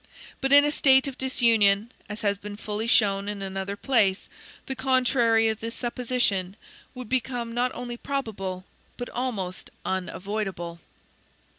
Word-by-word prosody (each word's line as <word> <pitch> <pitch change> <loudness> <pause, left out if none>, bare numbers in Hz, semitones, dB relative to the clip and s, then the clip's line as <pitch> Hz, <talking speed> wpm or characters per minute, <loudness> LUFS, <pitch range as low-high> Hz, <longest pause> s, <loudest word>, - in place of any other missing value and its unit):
But 270 0 0
in 285 +1 +8
a 295 - +1
state 265 -2 +4
of 270 - -5
disunion 230 -4 +3 0.2
(as 210 +1 -6
has 200 -2 0
been 205 0 -7
fully 215 +1 -3
shown 200 -3 +3
in 205 -1 -4
another 195 +1 -4
place), 205 -5 +1 0.4
the 265 - -3
contrary 250 -4 +3
of 220 -1 -1
this 230 +1 -5
supposition 240 -6 -1 0.4
would 250 -2 -7
become 245 -1 -1
not 245 +1 +1
only 240 -1 -5
probable, 195 -10 -4 0.3
but 245 - -5
almost 205 -8 -4 0.2
unavoidable. 190 -2 -3
225 Hz, 140 wpm, -26 LUFS, 200-250 Hz, 0.4 s, in